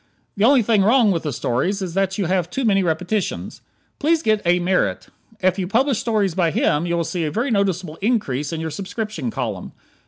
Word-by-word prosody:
The 205 - +2
only 260 -1 +5
thing 215 -1 +3
wrong 225 +1 +4
with 170 -3 0
the 150 - -3
stories 135 - -1
is 185 -4 -4
that 195 0 0
you 200 - 0
have 180 -1 0
too 265 +7 -2
many 195 -3 +3
repetitions. 180 +4 -2 0.4
Please 320 +2 +2
get 215 -1 +2
A. 175 +1 +4
Merritt. 175 - 0 0.3
If 185 +1 +2
you 185 - -2
publish 250 +4 +1
stories 210 -6 0
by 170 -1 +1
him 155 +1 +1
you 170 0 0
will 170 - 0
see 170 +1 -3
a 155 - -1
very 240 - -1
noticeable 185 -6 -1
increase 180 - 0
in 165 - -3
your 160 0 -4
subscription 195 - -4
column. - - -4
190 Hz, 210 wpm, -21 LUFS, 170-215 Hz, 0.4 s, only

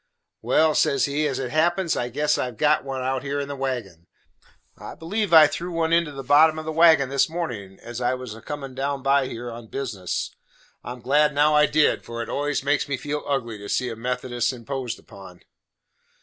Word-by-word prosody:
"Well," 155 0 +3
says 145 -3 +2
he, 150 +2 0
"as 135 -3 -2
it 130 -2 -4
happens, 170 +3 +1
I 120 - -2
guess 145 +4 +1
I - - 0
have 125 -3 -8
got 150 0 +3
one 135 -1 -4
out 130 0 -1
here 140 +1 -3
in 140 - -3
the 140 - -5
wagon. 120 -11 -4 0.7
I - - -9
believe 200 +5 -2
I 160 -2 +9
threw 175 +4 -3
one 165 -1 0
into 170 -2 +2
the 135 -1 -7
bottom 155 +4 +5
of 155 - -6
the 160 - -3
wagon 160 -4 +5
this 140 +2 +2
mornin', 115 - -5
as 120 +1 -7
I 125 +1 +1
was 125 -4 -7
a 115 - -12
comin' 140 -1 -6
down 135 +1 -3
by 135 -1 +3
here 120 -1 -6
on 115 0 -10
business. 110 -9 -4 0.5
I 120 - -6
am 125 - -13
glad 150 +4 +2
now 150 +1 +4
I 150 0 +5
did, 155 +1 +2
for 115 0 -5
it - - -9
always 145 -1 -1
makes 145 +1 0
me 135 - -1
feel 150 +1 -4
ugly 120 -6 -2
to 100 0 -9
see 125 - 0
a 115 - -5
Methodist 120 +1 -2
imposed 125 -1 -5
upon." 95 -4 -14
135 Hz, 220 wpm, -24 LUFS, 120-150 Hz, 0.7 s, I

